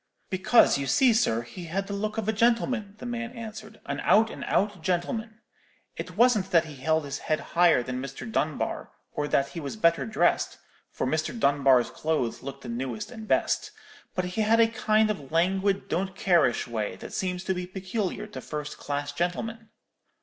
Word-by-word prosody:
"'Because, 190 -4 +4
you 140 - -2
see, 245 - +5
sir, 120 - +2
he 170 +9 -9
had 190 +4 -2
the 200 - -5
look 215 +2 -3
of 220 -2 -2
a 220 - +2
gentleman,' 230 -1 +1
the 230 - -9
man 240 -1 -4
answered; 220 -2 -9
'an - - -3
out 220 +2 +4
and - - -7
out 205 -3 0
gentleman. 215 +6 -2 0.5
It 180 0 -7
wasn't 220 -5 +4
that 170 -4 +4
he 150 -3 -10
held 160 +3 +1
his 140 -1 -4
head 155 -1 0
higher 170 -7 +5
than 125 +1 -4
Mr. 135 -1 -7
Dunbar, 110 - -2 0.2
or 150 - -2
that 140 -1 +1
he 170 - -6
was 145 +5 -5
better 170 - +2
dressed—for 110 - -1
Mr. 155 - -1
Dunbar's 135 - +4
clothes 155 -7 -1
looked 140 +1 -8
the - - -8
newest 135 - -4
and 220 -3 -9
best; - - +1 0.5
but 185 -2 0
he 180 +4 -2
had 220 +2 +4
a 230 - +7
kind 220 -2 +2
of 145 -10 -7
languid 190 +4 +1
don't 190 +1 -2
careish 170 -13 +2
way 110 -5 -3
that - - -10
seems 180 -1 -2
to 190 - 0
be 180 -1 -4
peculiar 190 +2 -3
to 210 - -8
first 150 -1 -6
class 145 0 -3
gentlemen.' 215 +8 -3
185 Hz, 185 wpm, -27 LUFS, 145-215 Hz, 0.5 s, a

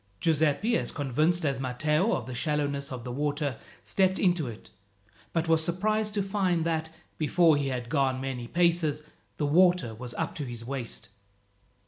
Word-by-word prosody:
Giuseppi, 160 +8 +2
as - - -3
convinced 155 +5 +1
as 135 -2 0
Matteo 150 - +1
of 120 - -4
the 130 - -6
shallowness 145 +1 -1
of 125 -2 -6
the 125 - -5
water, 145 -1 -1 0.2
stepped 190 -1 +2
into 175 -6 +2
it, 110 -2 -9 0.6
but 165 0 0
was 160 -1 +3
surprised 210 +5 0
to 200 - +1
find 190 -4 0
that, 160 -1 -1 0.3
before 165 +1 +4
he 145 -1 0
had 125 -2 -3
gone 130 0 +1
many 130 -3 -4
paces, 170 -2 +1 0.3
the 150 - 0
water 175 -5 +4
was 120 +2 -7
up - - -2
to 150 - -3
his 120 -2 -7
waist. 120 -5 -5
150 Hz, 165 wpm, -28 LUFS, 130-175 Hz, 0.6 s, before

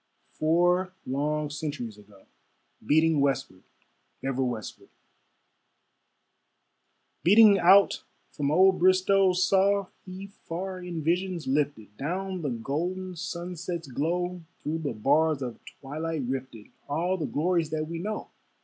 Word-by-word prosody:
Four 175 +4 +2
long 150 +3 -1
centuries 145 -7 -5
ago. 100 -2 -19 0.6
Beating 155 +4 +3
westward, 135 -9 -1 0.6
ever 135 0 0
westward, 120 -4 -5 2.3
Beating 205 +2 +7
out 195 +3 +5 0.3
from 145 -2 -2
old 185 +4 +4
Bristowe, 185 +1 +4
Saw 195 +1 +2
he 185 +1 -8
far 190 -1 -6
in 170 -3 -5
visions 175 +1 -1
lifted, 130 -7 -1
Down 185 +5 -3
the 145 - -2
golden 175 +10 -3
sunset's 170 -1 -5
glow, 175 +6 -2 0.2
Through 160 +2 -2
the 145 -5 -3
bars 145 +6 +2
of 120 -2 -6 0.2
twilight 155 +2 -4
rifted, 130 -4 -5 0.2
All 170 +6 0
the 160 -6 -3
glories 170 0 0
that 155 0 -2
we 165 +1 -5
know. 210 +4 -5
165 Hz, 115 wpm, -27 LUFS, 140-185 Hz, 2.3 s, Beating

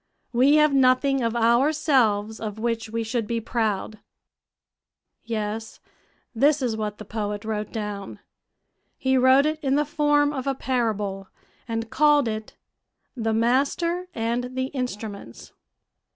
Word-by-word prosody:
We 260 +5 +5
have 300 -1 +4
nothing 270 +1 +3
of 230 0 -1
ourselves 235 -3 +2
of 215 -1 -5
which 230 0 -2
we 230 +1 -2
should 225 -1 -2
be 230 +1 -1
proud." 220 -2 -2 1.2
Yes, 220 -1 -4 0.5
this 285 +5 +3
is 235 -3 0
what 210 -1 -4
the 215 - -9
poet 210 0 -4
wrote 215 -1 -3
down. 210 -3 -5 0.8
He 265 -1 +1
wrote 260 +2 +5
it 310 0 -1
in 270 0 +2
the 295 +1 +2
form 295 0 +2
of 265 -1 -4
a 275 - 0
parable, 210 -7 -2 0.4
and 225 -1 -4
called 295 -3 +4
it 215 -1 -5 0.6
"The 225 -3 -1
Master 280 +10 +1
and 240 +2 -2
the 260 0 -2
Instruments." 210 - -6
235 Hz, 135 wpm, -24 LUFS, 220-270 Hz, 1.2 s, We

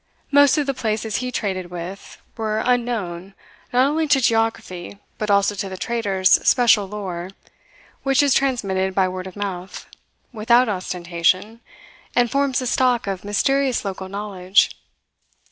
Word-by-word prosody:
Most 285 +1 +5
of 295 - +1
the 275 - -1
places 220 -3 -2
he 250 0 -3
traded 190 -6 -3
with 180 +3 -8 0.2
were 220 -1 -2
unknown 210 -7 -1 0.4
not 250 +1 +4
only 310 +3 0
to 280 -2 +4
geography 225 -6 -1 0.2
but 215 - -2
also 200 0 +3
to 200 -1 -4
the 190 - -7
traders' 195 -4 +2
special 230 -5 +4
lore 190 -3 -5 0.7
which 270 +1 +3
is 280 -2 +3
transmitted 195 -8 0
by 190 -1 +3
word 185 0 -5
of 185 - -11
mouth, 190 -3 -5 0.5
without 235 +3 +3
ostentation, 185 +2 -1 0.6
and 240 -2 +2
forms 275 -2 +1
the 255 - -1
stock 250 -1 +1
of 195 -2 -4
mysterious 260 +5 +1
local 190 -1 -5
knowledge. 200 -1 +1
210 Hz, 145 wpm, -21 LUFS, 190-245 Hz, 0.7 s, Most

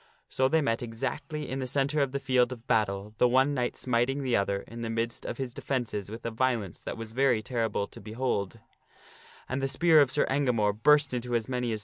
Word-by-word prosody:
So 130 - +2
they 160 +3 +3
met 115 -5 0
exactly 135 +6 -4
in 130 - -3
the 130 - -3
centre 140 +3 0
of 135 -2 +1
the 140 - -2
field 130 -2 +2
of 120 -2 -8
battle, 105 -4 0
the 125 - +6
one 130 +3 +3
knight 125 -3 -1
smiting 130 +3 0
the 125 -2 +1
other 100 0 0
in 115 0 -9
the 115 - -3
midst. 115 +1 -3
of - - -4
his 130 -3 -4
defences 120 -9 -3
with 115 +2 -8
a 115 - -1
violence 115 -6 -1
that - - -5
was 115 -1 -7
very 125 -3 +2
terrible 115 -5 -1
to - - -13
throws - - -16
Sir - - -7
En - - -7
behold. 115 -6 -1 0.9
And 130 +1 -2
the 135 - +1
spear 155 +3 +5
of 140 - +3
Sir 145 - +2
Engamore 125 -7 +2
burst 145 +5 +4
into 120 0 -2
as 115 -2 0
many 125 -2 -1
gamore. 110 - -2
125 Hz, 240 wpm, -28 LUFS, 115-135 Hz, 0.9 s, the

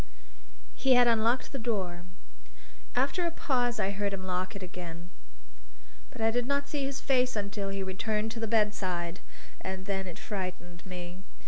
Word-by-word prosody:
He 265 -2 +5
had 245 0 +7
unlocked 230 +2 +3
the 275 - -3
door; 190 -7 -1 0.9
after 275 +8 +2
a 340 - +3
pause 245 -7 +1
I 195 - +2
heard 200 0 -1
him 190 -1 -3
lock 185 0 -1
it 200 - -5
again. 175 -1 -7 1.0
But 230 - -8
I 225 0 +4
did 245 +1 +1
not 280 0 +1
see 285 -2 -1
his 275 0 -2
face 255 -2 +3
until 200 -1 -1
he 195 0 -1
returned 210 +3 0
to 230 - -5
the 225 - 0
bedside. 190 -5 +1 0.4
And 190 0 -4
then 190 -1 -1
it 175 - -6
frightened 185 -3 -5
me. 180 0 -6
205 Hz, 165 wpm, -31 LUFS, 185-245 Hz, 1.0 s, had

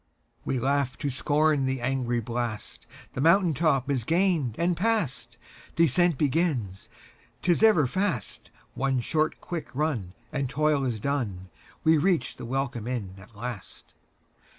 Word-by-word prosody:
We 130 - 0
laugh 135 0 0
to 140 - -2
scorn 145 +3 +2
the 130 0 -1
angry 125 -1 0
blast, 115 -1 -4 0.3
The 130 - -3
mountain 170 +2 +4
top 140 -4 +1
is 135 -5 0
gained 165 - +1
and 175 +1 +1
past. 160 - -1 0.4
Descent 170 0 +3
begins, 135 - 0 0.5
't 180 - +3
is 170 - +2
ever 215 -10 +6
fast—One 135 - -2
short 155 +5 0
quick 170 -3 -5
run, 130 - -1 0.2
and 140 -4 -2
toil 145 +1 +1
is 120 -4 -2
done, 105 -9 -3 0.3
We 160 -1 +5
reach 170 -5 +1
the - - -7
welcome 125 -3 -2
inn 115 -7 -3
at 100 +3 -16
last. 115 -2 -7
135 Hz, 140 wpm, -27 LUFS, 120-160 Hz, 0.5 s, ever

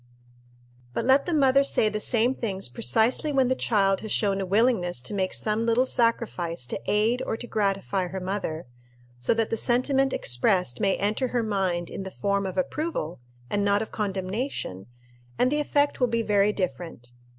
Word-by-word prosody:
But - - -1
let 270 +4 +4
the 350 - 0
mother 275 -1 +4
say 250 -5 +2
the 215 0 -2
same 235 +3 +2
things 195 - -2
precisely 220 - +1
when 265 -3 +2
the 260 - +2
child 195 -6 +2
has 220 - -6
shown 195 -2 +1
a 190 - -3
willingness 200 - +2
to 210 - -5
make 190 -2 0
some 215 +1 0
little 235 +3 +3
sacrifice 215 - 0
to - - -5
aid 220 +4 +2
or 225 - -2
to 240 - -7
gratify 195 -4 -1
her 190 +2 -5
mother, 185 -4 -3 0.5
so 125 - +1
that 225 -1 0
the 225 - 0
sentiment 265 +3 +2
expressed 125 - +1
may 195 -1 +2
enter 210 +6 0
her 240 -1 -1
mind 190 -5 -1
in - - -5
the 190 - -5
form 200 0 -1
of 185 - -6
approval 275 - -2 0.3
and 205 +7 -1
not 205 +1 +2
of 220 - -10
condemnation, 195 - -3 0.5
and 255 - +2
the 295 - +1
effect 290 -1 +1
will 250 - +3
be 230 -1 0
very 205 -1 +3
different. 165 - -5
210 Hz, 185 wpm, -26 LUFS, 190-245 Hz, 0.5 s, let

